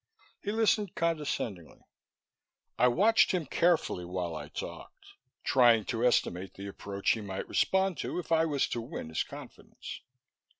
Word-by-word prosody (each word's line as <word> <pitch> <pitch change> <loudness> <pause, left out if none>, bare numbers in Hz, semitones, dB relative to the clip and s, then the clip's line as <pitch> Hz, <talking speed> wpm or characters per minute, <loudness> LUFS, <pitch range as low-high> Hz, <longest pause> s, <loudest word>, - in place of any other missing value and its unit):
He 205 - -2
listened 215 -3 +1
condescendingly. 150 - -2 0.9
I 125 - +4
watched 205 - +4
him 175 -4 0
carefully 165 - +1
while 90 -2 -3
I - - -6
talked, - - -8 0.4
trying 120 -5 +5
to 115 -1 -2
estimate 95 -6 +1
the 100 - -8
approach 100 0 -2
he 110 - 0
might 95 -2 -5
respond 190 -2 +1
to - - -3
if 175 -2 -5
I 165 0 +4
was 145 -3 +1
to 120 - -2
win 115 -8 -6
his 80 - -1
confidence. - - -9
125 Hz, 145 wpm, -30 LUFS, -, 0.9 s, trying